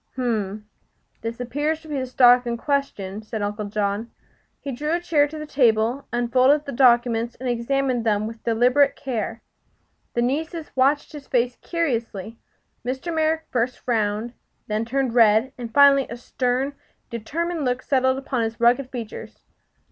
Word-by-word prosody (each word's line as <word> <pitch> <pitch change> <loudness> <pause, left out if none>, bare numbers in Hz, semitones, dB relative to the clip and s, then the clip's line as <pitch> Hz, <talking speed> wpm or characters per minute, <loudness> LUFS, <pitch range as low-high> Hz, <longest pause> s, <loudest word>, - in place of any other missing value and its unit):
"H - - -36
m. 210 -4 -2 0.5
This 230 +1 -5
appears 295 +6 -2
to - - -13
be 295 -3 -2
the 260 - -3
stock 245 -1 +5
in 235 0 -1
question," 225 -8 -2
said 215 -1 -5
Uncle 210 +1 -3
John. 205 +2 -2 0.5
He 280 - -5
drew 300 +5 -2
a 345 - +2
chair 315 -4 +2
to 310 +2 -8
the 305 - -5
table, 240 -2 +2
unfolded 255 +5 +3
the 280 - -5
documents 240 -2 +3
and 255 - -6
examined 245 +1 0
them 215 -2 +1
with 225 0 -8
deliberate 250 +5 +3
care. 230 -3 -4 0.7
The 240 - +2
nieces 315 +5 -2
watched 275 +3 +2
his 290 -3 -10
face 245 -1 +1
curiously. 230 - -3 0.4
Mr. 265 +7 -3
Merrick 320 0 +1
first 245 0 0
frowned, 220 0 -1 0.3
then 215 +1 -2
turned 260 0 -1
red, 230 +2 +4
and 235 -2 -7
finally 280 +1 +6
a 235 - -6
stern, 250 +3 -1 0.4
determined 320 +8 -3
look 250 0 -1
settled 260 -1 +2
upon 270 -2 -2
his 225 0 -3
rugged 245 +3 +3
features. 235 -4 -8
245 Hz, 160 wpm, -23 LUFS, 230-275 Hz, 0.7 s, finally